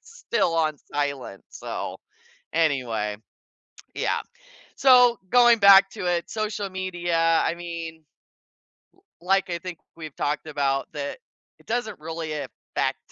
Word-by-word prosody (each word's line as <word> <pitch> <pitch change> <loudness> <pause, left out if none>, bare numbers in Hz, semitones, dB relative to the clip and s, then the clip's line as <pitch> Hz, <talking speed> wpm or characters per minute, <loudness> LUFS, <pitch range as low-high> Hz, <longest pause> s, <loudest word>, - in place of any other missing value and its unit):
still 235 - -1
on 155 -2 +1 0.2
silent. 140 -8 -3
So, - - -6 0.6
anyway 125 -10 0 0.8
yeah, - - 0 0.5
so, 250 -3 +6
going 240 0 +6
back 195 -1 +8
to - - -6
it, 175 -1 0
social 210 -2 -2
media, 175 -3 +1
I - - +1
mean, 170 -1 -6 1.3
l 180 - -14
like 195 -1 +3
I 170 - -2
think 175 -1 -7 0.2
we've 155 -4 -9
talked 150 +2 -2
about 140 -2 -1
that 145 -1 -5 0.4
it - - -23
doesn't 220 -6 -3
really 160 0 -5
affect 150 -1 -3
170 Hz, 125 wpm, -25 LUFS, 150-195 Hz, 1.3 s, back